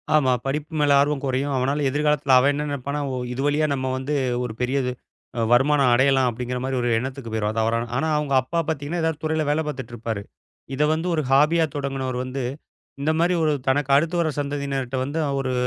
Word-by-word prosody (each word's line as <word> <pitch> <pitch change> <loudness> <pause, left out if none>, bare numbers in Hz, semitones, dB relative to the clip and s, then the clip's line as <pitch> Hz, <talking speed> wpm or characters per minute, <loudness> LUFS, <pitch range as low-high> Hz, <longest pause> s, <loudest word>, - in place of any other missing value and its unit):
ஆமா. 130 -4 +4
படிப்பு 150 +4 -3
மேல 145 -1 +3
ஆர்வம் 145 0 +1
குறையும். 135 +2 -1
அவனால 140 +3 0
எதிர்காலத்துல 150 -1 +2
அவன் 140 +2 +3
என்ன 150 +1 -2
நினைப்பான்னா, 140 +1 -3
ஓ - - -2 0.2
இது 130 - -3
வழியா 150 +1 +2
நம்ம 130 -1 -2
வந்து 130 +3 -3 0.3
ஒரு 115 -3 -4
பெரியது 125 0 0 0.5
அ - - +1
வருமானம் 135 +1 +4
அடையலாம், 135 0 +4
அப்டிங்கிற 125 +1 -4
மாரி 130 0 -2
ஒரு 120 - 0
எண்ணத்துக்குப் 130 -1 -5
போயிரும் 105 -1 0
அதவரான. 115 +1 0
ஆனா, 160 +4 0
அவங்க 145 -2 -1
அப்பா 165 +7 -2
பாத்தீங்கன்னா 160 +3 -2
ஏதாது 160 -2 -1
துறைல 155 -1 0
வேலை 155 +2 +1
பாத்துட்டுருப்பாரு. 120 -6 -5 0.5
இதை 150 +3 +2
வந்து 165 +3 -2
ஒரு 155 - 0
ஹாபியா 155 +4 +4
தொடங்குனவரு 135 -3 -3
வந்து, 130 0 -4 0.6
இந்த 155 +2 +1
மாரி 175 +2 +3
ஒரு 155 - +2 0.2
தனக்கு 140 +1 +1
அடுத்து 165 +4 0
வர 155 -2 0
சந்ததியினர்ட்ட 140 -2 -3
வந்து 145 +4 -3
அ - - -1
ஒரு 130 -1 -2
140 Hz, 190 wpm, -23 LUFS, 130-150 Hz, 0.6 s, ஆமா